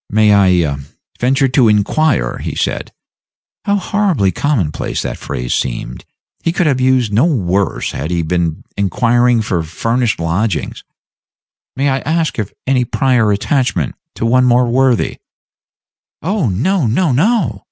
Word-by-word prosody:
"May 105 0 +4 0.3
I 70 -2 -2 0.4
venture 135 +3 +2
to 125 -2 +3
inquire," 105 - +1
he - - -5
said - - -2 0.7
how 200 - +2
horribly 190 - +1
commonplace 110 - -1
the - - -3
phrase - - -4
seemed; - - -3 0.4
he 165 - +1
could 175 +1 0
have 135 -4 +1
used 130 -4 +2
no 115 +9 +4
worse 100 - 0
had 75 - -4
he 85 -1 -1
been 85 -1 -1
inquiring 120 +4 +2
for 90 -4 -1
furnished 115 +8 -1
lodgings 85 +1 -2 0.9
"may 140 +2 0
I 135 -1 +1
ask 160 -3 -1
if 105 -2 -3
any 130 -1 +2
prior 125 -3 +1
attachment 100 - 0 0.2
to - - -3
one 125 +2 +3
more 125 0 +4
worthy 130 0 +1 0.5
" - - -81
"Oh 185 - 0
no, 155 - 0
no, 150 +8 +1
no!" 150 - +1
120 Hz, 140 wpm, -15 LUFS, 100-140 Hz, 0.9 s, May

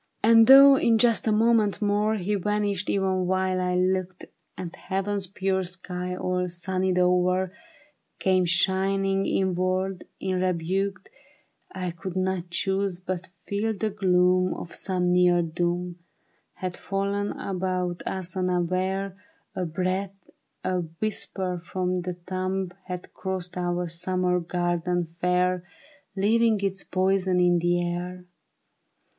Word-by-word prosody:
THE 220 - +4
BARRICADE. 230 0 +8
And 225 - +7
though 275 +1 +10
in 230 -3 +3
just 230 -1 +3
a - - +3
moment 220 -1 +3
more 210 +1 +1
He 205 0 -2
vanished 205 0 -1
even 190 -2 +1
while 185 0 +1
I 180 0 0
looked, 185 0 0 0.3
And 175 -2 -6
heaven's 195 0 -2
pure 190 0 -1
sky 180 0 -5
all 180 0 -1
sunnied 185 +1 -1
o'er 180 +1 +2 0.6
.Came 185 -1 +2
shining 195 +2 +1
inward 185 0 0
unrebuked, 185 +1 -1 0.6
I 185 -2 -3
could 170 +2 -7
not 185 -1 -1
choose 190 +1 -1
but 185 0 -5 0.2
feel 215 +2 -1
the 215 +1 -1
gloom 185 -2 +2
Of 170 - -8
some 180 -2 0
near 180 -1 +4
doom 175 +2 -2 0.6
Had 185 -1 -4
fallen 200 +1 -2
about 185 -2 -2
us 185 -1 -3
unaware; 185 +1 -1 0.4
A 180 - -1
breath, 185 +4 -2 0.5
a 185 -1 0
whisper 180 +1 -3
from 180 0 -2
the 180 0 -4
tomb 185 +1 -3
Had 180 -1 -7
crossed 185 -2 -4
our 175 0 -1
summer 180 +2 0
garden 175 0 -1
fair, 180 +2 0 0.5
Leaving 220 +2 +3
its 195 -1 -1
poison 185 -1 +1
in 175 -1 +4
the 175 +1 +1
air. 180 +1 -5
185 Hz, 125 wpm, -26 LUFS, 180-195 Hz, 0.6 s, though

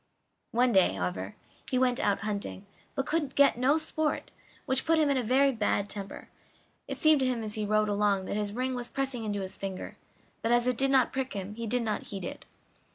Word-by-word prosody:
One 245 +2 +3
day, 190 - +4
however, 95 +1 -3 0.3
he 255 - +1
went 250 0 +2
out 205 -7 +1
hunting, 205 -2 -4 0.3
but 270 - -1
could 300 -4 -1
get 280 0 +5
no 260 +5 +3
sport, 315 -1 -2 0.3
which 265 -2 +1
put 325 0 +3
him 300 -2 +3
in 275 - +2
a - - +2
very 265 +4 +3
bad 205 -3 0
temper; 200 -1 -6 0.6
it - - -4
seemed 310 -2 +5
to 260 - +2
him 245 -3 -1
as 215 -1 -4
he 215 -1 -1
rode 215 0 +2
along 205 -2 +1
that - - -3
his 205 -1 -1
ring 255 +4 -2
was 245 -1 -4
pressing 270 -4 -2
into 205 -1 -2
his 190 0 -3
finger, 195 -1 -6 0.4
but 230 - 0
as 240 0 +4
it 250 0 +2
did 270 0 +4
not 265 -2 +3
prick 265 -1 -2
him 200 0 -5
he 230 +1 -5
did 245 +2 0
not 215 -2 -2
heed 195 -3 -5
it. - - -7
235 Hz, 220 wpm, -29 LUFS, 205-265 Hz, 0.6 s, get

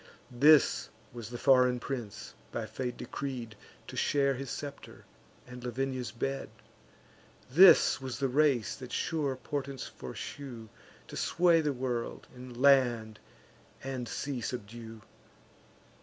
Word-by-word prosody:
This 145 +3 +5 0.2
was 115 -3 -7
the 120 - -6
foreign 125 -1 +4
prince, 120 -6 -6 0.2
by 115 - -3
fate 125 +3 -4
decreed 125 -6 -5 0.3
To - - -9
share 140 -1 +2
his 135 0 -6
scepter, 140 +1 -8 0.4
and 125 -1 -10
Lavinia's 130 +1 -3
bed; 135 +4 -3 1.0
This 165 -5 +7
was 130 -2 -5
the 140 - 0
race 135 -4 +2
that 130 -2 -9
sure 145 -5 -1
portents 140 0 -4
foreshew 115 - -8 0.4
To - - -9
sway 170 -1 +3
the 150 -2 0
world, 125 -3 -3
and 125 -1 -10
land 120 -6 +4 0.6
and 130 -3 -4
sea 135 -3 -3
subdue. 115 -2 -7
130 Hz, 120 wpm, -31 LUFS, 120-140 Hz, 1.0 s, This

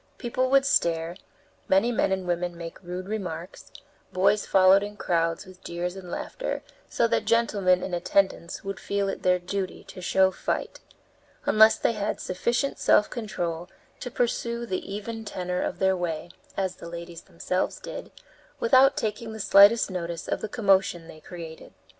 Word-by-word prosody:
People 255 +1 -1
would 275 0 +4
stare, 170 -8 +1 0.5
many 195 +6 +3
men 225 - +1
and 190 -1 -1
women 175 0 -1
make 165 -1 -8
rude 180 +1 -6
remarks, 185 -4 -6 0.4
boys 195 +3 +2
followed 190 +1 +6
in 205 0 -6
crowds, 165 0 0
with 185 0 -15
jeers 175 +1 -4
and 185 -2 -9
laughter, - - -4 0.3
so 235 - +2
that - - +1
gentlemen 205 -5 +2
in 185 - -4
attendance 175 0 0
would 195 0 -5
feel 200 0 -1
it - - -4
their 180 0 +3
duty 185 +1 -4
to 185 - -11
show 190 +1 +3
fight, - - -3 0.7
unless 220 +1 +6
they - - +1
had 210 -2 -2
sufficient 240 +9 -1
self 210 - +4
control 175 -7 -4 0.3
to 250 - -5
pursue 235 -1 -1
the 190 -3 -4
even 225 +2 -5
tenor 180 -3 -3
of - - -2
their 190 0 +2
way, 170 -1 -3 0.3
as 190 -2 -1
the 170 - -9
ladies 170 0 -8
themselves 180 0 -2
did, - - -8 0.5
without 265 +3 +5
taking 220 +1 -3
the 220 - -8
slightest 200 +2 +6
notice 170 -2 -4
of - - -2
the 215 - -4
commotion 195 -6 +2
they 155 - -12
created. 165 -1 -10
190 Hz, 165 wpm, -26 LUFS, 175-215 Hz, 0.7 s, followed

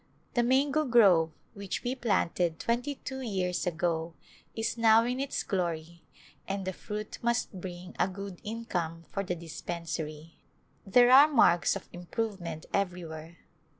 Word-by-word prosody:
The 240 - +3
mango 275 +5 +3
grove 200 - +5 0.2
which 200 -3 -5
we 245 - -1
planted 175 -9 0
twenty 245 +5 -1
two 265 0 -6
years 185 -6 -1
ago 165 -1 -1 0.4
is 225 0 -1
now 225 -1 +6
in 250 +2 -1
its 275 0 -2
glory 170 -3 -3 0.5
and 195 0 -3
the 190 - -2
fruit 210 +3 -6
must 235 -5 -1
bring 180 0 -8
a - - +3
good 195 -1 -7
income 175 -7 -4
for 195 - -2
the 180 -2 -2
dispensary. 165 -1 -6 0.5
There 245 +5 +6
are 275 +3 +9
marks 225 - +4
of - - -7
im 175 0 -9
provement 190 -8 -3
everywhere. 170 -4 -3
190 Hz, 145 wpm, -30 LUFS, 170-235 Hz, 0.5 s, are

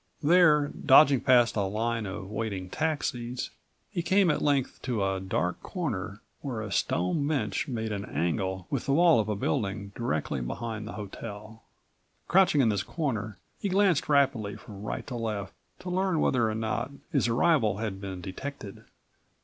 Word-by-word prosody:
There, 150 -3 +5
dodging 140 -2 +7
past 125 -3 +4
a 105 - +1
line 110 +3 -1
of 95 0 -6
waiting 100 -5 -4
taxis, 130 -6 -2 0.4
he 175 - -1
came 190 0 +3
at - - -1
length 140 -3 0
to 115 -7 -1
a 95 0 -1
dark 90 -2 -2
corner 105 - -4 0.2
where 130 -6 -4
a 105 -2 -6
stone 90 - 0
bench 150 -3 -1
made 110 -4 -3
an 100 -1 -3
angle 95 +2 -2
with 135 - -2
the 135 - +2
wall 165 -2 +5
of 110 -1 -1
a 105 - 0
building 100 -3 -2
directly 80 - -2
behind 110 - -4
the - - -6
hotel. 105 +1 -8 0.7
Crouching 180 -6 +4
in 115 - +3
this 100 -3 +1
corner, 115 - -3 0.2
he 200 - -2
glanced 190 -6 +2
rapidly 135 -8 +2
from 100 -4 -11
right 105 - -4
to 130 - -7
left 110 -4 -3 0.3
to 180 0 -5
learn 185 -2 +1
whether 120 -6 +2
or 110 - -2
not 115 +3 -2 0.2
his 140 -5 +2
arrival 115 - +3
had 105 -3 -4
been 95 -2 -6
detected. 100 +2 -7
115 Hz, 165 wpm, -28 LUFS, 100-145 Hz, 0.7 s, dodging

